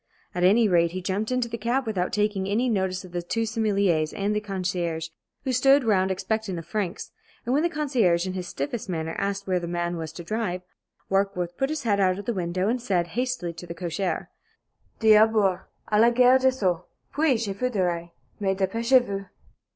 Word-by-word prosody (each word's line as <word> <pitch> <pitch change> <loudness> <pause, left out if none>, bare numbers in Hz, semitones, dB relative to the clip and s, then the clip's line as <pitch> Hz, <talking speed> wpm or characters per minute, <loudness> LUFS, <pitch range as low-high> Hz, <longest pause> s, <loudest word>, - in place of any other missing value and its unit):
At 180 - -1
any 215 +5 +5
rate, 170 -3 +3
he 185 - -3
jumped 200 +5 -1
into 250 -1 0
the 230 0 -5
cab 245 +4 0
without 190 -5 -1
taking 205 -2 0
any 230 +6 +1
notice 190 -3 -1
of 180 - -13
the 175 0 -2
two 225 +6 -1
sommeliers 200 -8 +1
and 205 +1 -1
the - - +2
concierge 180 -5 -2 0.3
who 260 - -1
stood 270 +3 +5
round 190 -4 +2
expectant 195 0 -2
of 165 - -7
francs, 205 -5 -3 0.3
and 245 - 0
when 290 - +3
the 340 - +2
concierge 250 - +1
in 185 - -3
his 180 -1 -4
stiffest 180 +11 -4
manner 160 -2 -2
asked 200 0 -2
where 185 -1 +1
the 170 - -5
man 175 0 -2
was 160 -2 -5
to 170 - -8
drive, 185 -2 -2 0.5
Warkworth 185 -3 0
put 270 +6 0
his 310 -1 -3
head 205 -4 +1
out 185 -1 +3
of 200 - -7
the 240 - -1
window 185 0 -1
and 245 +2 0
said, 180 -7 0
hastily, 245 -5 -2
to 170 +1 -10
the 170 - -6
cocher: 175 +2 -3 0.7
"D'abord, 215 -3 +5 0.3
à 210 0 +4
la 235 - +7
Gare 250 +2 +5
de 260 0 +4
Sceaux! 185 -9 -1 0.3
Puis, 295 -4 +2
je 200 - -3
vous 250 +6 -1
dirai. 175 -6 -1 0.3
Mais 195 -2 0
dépêchez 230 +6 +3
vous!" 195 -2 -4
195 Hz, 205 wpm, -25 LUFS, 180-230 Hz, 0.7 s, la